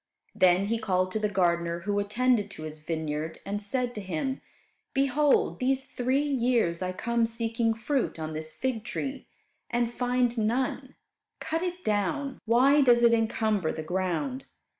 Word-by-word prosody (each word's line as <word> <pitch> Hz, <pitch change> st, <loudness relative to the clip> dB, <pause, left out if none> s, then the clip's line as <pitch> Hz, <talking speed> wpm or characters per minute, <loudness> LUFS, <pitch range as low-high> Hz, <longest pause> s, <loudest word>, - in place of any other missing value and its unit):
Then 185 Hz, +1 st, +4 dB
he 225 Hz, +2 st, -1 dB
called 185 Hz, -4 st, 0 dB
to 215 Hz, -, -1 dB
the 210 Hz, -1 st, 0 dB
gardener 170 Hz, -3 st, +1 dB
who 205 Hz, +2 st, 0 dB
attended 225 Hz, +2 st, +1 dB
to 155 Hz, -, -9 dB
his 155 Hz, 0 st, -7 dB
vineyard, 155 Hz, 0 st, -3 dB
and 205 Hz, +1 st, -3 dB
said 245 Hz, +4 st, -2 dB
to 210 Hz, -, -5 dB
him, 195 Hz, -, -3 dB, 0.5 s
"Behold 275 Hz, +1 st, +2 dB
these 265 Hz, +1 st, +1 dB
three 260 Hz, +3 st, 0 dB
years 240 Hz, -11 st, +1 dB
I 185 Hz, 0 st, -1 dB
come 235 Hz, +5 st, 0 dB
seeking 230 Hz, 0 st, -1 dB
fruit 245 Hz, -, -1 dB
on 155 Hz, 0 st, -4 dB
this 155 Hz, 0 st, -5 dB
fig 245 Hz, +2 st, -2 dB
tree, 270 Hz, +2 st, -5 dB, 0.4 s
and 240 Hz, 0 st, 0 dB
find 245 Hz, -1 st, +1 dB
none. 240 Hz, +4 st, -1 dB, 0.4 s
Cut 325 Hz, +1 st, -2 dB
it 360 Hz, 0 st, -4 dB
down. 215 Hz, +7 st, -1 dB
Why 260 Hz, +6 st, +5 dB
does 240 Hz, -3 st, +5 dB
it 235 Hz, 0 st, +6 dB
encumber 220 Hz, -6 st, +1 dB
the 155 Hz, -, -5 dB
ground?" 190 Hz, -, -2 dB
225 Hz, 160 wpm, -28 LUFS, 185-255 Hz, 0.5 s, it